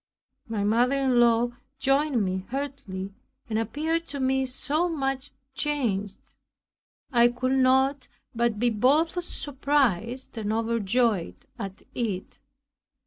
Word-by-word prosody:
My 220 -3 -2
mother 240 +6 +3
in 265 -3 +2
law 235 0 +4 0.3
joined 270 -4 +2
me 185 0 -3
heartily 255 -8 -5 0.3
and 220 -2 0
appeared 310 +9 -1
to 285 0 -5
me 265 0 +1
so 305 +7 0
much 270 -4 -2 0.2
changed. 230 -10 -1 0.9
I 240 -2 +6
could 245 +2 -1
not 265 +1 +3 0.3
but 235 -2 +1
be 240 +2 +2
both 305 - +2
surprised 260 - -1
and 210 -1 -2
overjoyed 225 -3 0
at 195 -1 -6
it. 205 -6 -3
250 Hz, 115 wpm, -26 LUFS, 220-275 Hz, 0.9 s, I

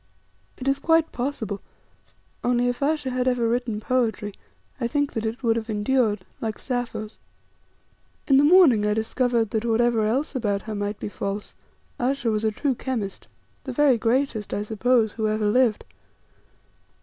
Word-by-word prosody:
It 260 - -6
is 275 0 +2
quite 325 +2 +3
possible, 230 -6 -3 0.8
only 245 0 +2
if 245 +2 -2
Ayesha 290 -2 0
had 250 0 -1
ever 245 -2 +2
written 235 -2 -1
poetry 220 -3 -1 0.5
I 235 - 0
think 285 +3 -1
that 225 -1 -2
it 230 +4 -5
would 225 -1 +3
have 225 0 -4
endured, 210 -2 +1 0.2
like 220 -2 -3
Sappho's. 240 -4 -4 1.1
In 270 - +5
the 280 - +5
morning 295 - +6
I 210 0 +1
discovered 230 0 0
that 220 -1 -1
whatever 230 -1 +2
else 265 +8 -1
about 205 -6 -1
her 220 - -5
might 205 0 -3
be - - -4
false, 200 0 -4 0.5
Ayesha 250 -1 0
was 215 0 -1
a 220 - +3
true 265 +6 -1
chemist, 230 -6 -4 0.4
the 260 - -5
very 270 -3 +4
greatest, 230 -2 0
I 205 - -2
suppose, 220 +1 +1
who 220 -1 -1
ever 215 0 0
lived. 230 +1 +2
235 Hz, 160 wpm, -24 LUFS, 215-260 Hz, 1.1 s, morning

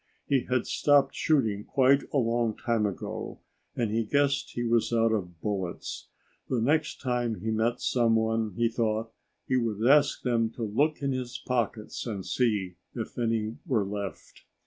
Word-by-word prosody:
He 135 -3 +1
had 125 -1 +1
stopped 145 -1 +3
shooting 115 -10 +1
quite 135 +2 +4
a - - +1
long 115 -3 +1
time 115 -4 +1
ago, 100 - -5 0.4
and 115 -3 0
he 115 +1 +1
guessed 140 +4 +1
he 120 - -1
was 115 -1 +2
out 115 -1 +3
of 90 -6 -3
bullets. 95 -4 -4 0.4
The 125 - +1
next 150 +7 +1
time 120 -3 0
he 110 - -1
met 115 +2 +1
someone, 115 -3 +1
he 120 - +3
thought, 115 -1 -1 0.3
he 130 - +1
would 115 -2 -1
ask 145 +1 +4
them 115 -3 +1
to 120 - -5
look 140 +9 0
in 140 - +1
his 125 -1 -3
pockets 115 -2 -2
and 100 -5 -4
see 105 -8 0 0.2
if 115 0 -5
any 115 -1 -1
were 115 -9 +1
left. 100 -1 -6
115 Hz, 165 wpm, -28 LUFS, 110-125 Hz, 0.4 s, quite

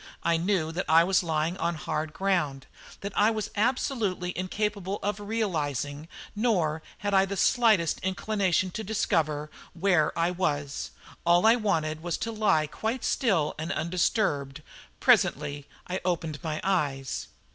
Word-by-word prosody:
I 170 - +3
knew 170 -1 0
that 175 +3 -3
I 165 +1 +7
was 185 +1 +3
lying 165 +1 -1
on 170 -1 -1
hard 155 0 -3
ground; 160 -8 -1 0.4
that 200 0 -5
I 210 +2 +5
was 220 -2 -3
absolutely 210 -6 0
incapable 200 +1 -2
of 205 0 -1
realising, 155 - -2 0.3
nor 180 -9 +1 0.2
had 205 -1 -2
I 190 0 +5
the 200 0 -4
slightest 215 -8 +3
inclination 190 -1 0
to 220 - -5
discover, 155 -8 0 0.2
where 175 -3 +2
I 170 +1 +2
was. 145 - -2 0.3
All 175 +3 +4
I 225 +1 +7
wanted 160 -9 -1
was 175 0 -2
to 230 - -3
lie 210 -8 +2
quite 225 - -3
still 190 - +1
and 160 +2 -3
undisturbed. 155 - 0 0.4
Presently 145 0 +2 0.2
I 185 +1 -3
opened 165 -4 -2
my 155 -2 -3
eyes. 140 - -1
175 Hz, 145 wpm, -27 LUFS, 155-205 Hz, 0.4 s, I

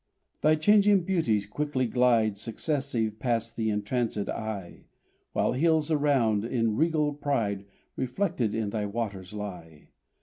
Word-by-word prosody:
Thy 155 +1 +5
changing 200 +3 +4
beauties 160 - +1
quickly 130 +4 -1
glide 115 -3 +3
Successive 115 -1 -2
past 115 -2 -1
th' - - -9
entrancéd 105 0 -1
eye, 105 -5 -5 0.5
While - - +1
hills 160 +2 +2
around, 135 -9 +2
in 115 -2 0
regal 155 0 +1
pride, 115 -9 -1 0.3
Reflected 125 - -1
in 110 -2 -1
thy 105 -1 -2
waters 100 -4 -4
lie. 90 -7 -8
115 Hz, 125 wpm, -28 LUFS, 105-150 Hz, 0.5 s, Thy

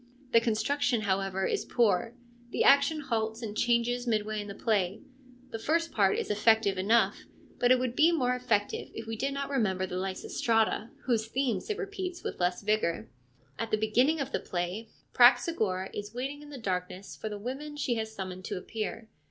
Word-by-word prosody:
The 230 - +6
construction, 240 +2 +1
however, 190 -1 0
is - - 0
poor: 230 0 +1 0.3
the - - 0
action 280 +3 +5
halts 225 -3 -2
and 210 -2 -5
changes 240 +1 +1
midway 215 -1 0
in 205 - -8
the 200 - -7
play; 200 -3 0 0.5
the 225 - -4
first 330 +6 0
part 195 -3 +3
is - - -2
effective 210 -1 +3
enough, 210 +5 +2 0.3
but 245 0 +4
it 255 - +7
would 250 -1 -2
be 320 +5 +5
more 250 -7 +1
effective 225 -5 -1
if 225 - -6
we 225 0 -4
did 275 +5 -1
not 275 0 -4
remember 190 -8 +1
the 180 -1 -5
Lysistrata, 220 +4 0 0.2
whose 230 -3 +1
themes 245 -5 -1
it 425 - -1
repeats 380 -4 -5
with - - -5
less 180 +2 0
vigour. 170 - 0 0.5
At 230 - -2
the 215 - +2
beginning 245 +9 +2
of 275 -1 -3
the - - 0
play 180 +5 -4 0.2
Praxagora 240 - +4
is 205 +2 -6
waiting 275 +4 -4
in 295 - -12
the 285 - -8
darkness 185 -3 -4
for 220 - -5
the 210 - -5
women 270 +7 -6
she 275 -4 0
has 220 0 -3
summoned 185 -3 -6
to - - -3
appear. 220 +3 -5
225 Hz, 185 wpm, -29 LUFS, 205-255 Hz, 0.5 s, it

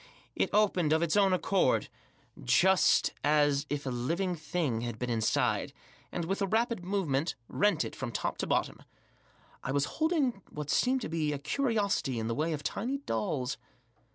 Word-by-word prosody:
it - - +1
opened 190 -7 +2
of 160 +1 +2
its 170 +1 +1
own 200 -2 +4
accord, 185 -5 +2 0.6
just 190 - +4
as 145 -1 +3
Digitized - - -39
by - - -1
if 145 - -7
a - - -1
living 170 +10 -1
thing 155 -7 -2
had 120 -2 -4
been 125 +1 -3
Inside, 110 -2 +1 0.4
and, 170 - -3
with 195 +4 -2
a 195 - +1
rapid 225 -1 0
movement, 175 -6 -1
rent 200 -6 +1
it - - -7
from 130 -3 -4
top - - -3
to - - -2
bottom. - - 0 0.8
I 135 - -2
was 140 +1 +1 0.2
holding 295 - +1
what 150 -1 -5
seemed 255 +1 +2
to - - -3
be 155 -2 -1
a - - -2
curiosity 200 - 0
in 110 - -2
the 115 - -1
way 155 +6 -1
of 150 -2 -3
tiny 245 - -2
dolls. 125 - -2
165 Hz, 180 wpm, -30 LUFS, 140-200 Hz, 0.8 s, own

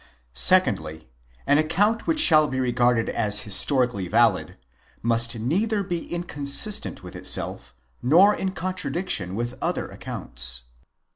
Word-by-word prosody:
Secondly. 75 +5 +2 0.4
An 145 - +3
account 205 +9 0
which 320 -1 +1
shall 155 - +6
be 130 -2 -4
regarded 120 -2 +1
as 105 -2 0
historically 110 0 +2
valid, 110 0 +1 0.5
must 115 0 +1
neither 200 - -1
be 175 -3 -5
inconsistent 175 - -2
with 90 - -11
itself, 60 - -4 0.3
nor 175 +11 +5
in 190 - -3
contradiction 175 - -4
with 120 +2 -5
other - - -2
accounts. - - -5
130 Hz, 120 wpm, -23 LUFS, 110-175 Hz, 0.5 s, shall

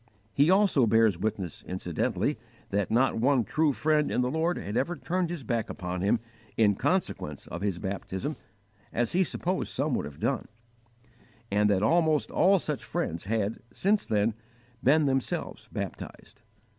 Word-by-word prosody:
He 145 +9 +4
also 185 - +4
bears 110 -5 +4
witness 95 -4 -3
incidentally 90 -2 -1 0.3
that 100 -1 0
not 125 +4 +2
one 130 +1 +3
true 155 +6 +2
friend 150 +2 +1
in - - +1
the 125 0 0
Lord 165 +3 0
had 100 - -5
ever 170 +9 0
turned 180 0 -1
his 170 -5 -5
back 115 -1 -1
upon 90 0 -4
him 100 +4 +2 0.4
in 105 -2 +5
consequence 100 - -1
of 85 - -7
his 100 -3 -1
baptism, 95 - -4 0.6
as 120 -1 0
he 185 +2 +3
supposed 185 +1 -2
some 140 +1 0
would - - 0
have 70 -1 -10
done; - - -1 1.0
and 105 +1 +3
that 100 -1 +2
almost 160 +4 +2
all 195 +4 +5
such 150 -5 -3
friends 85 +2 -3
had, 110 0 -1
since 205 +2 +1
then, 110 +1 +1 0.5
been 150 +4 +5
themselves 135 -2 -2
baptized. - - -7
120 Hz, 155 wpm, -28 LUFS, 100-155 Hz, 1.0 s, in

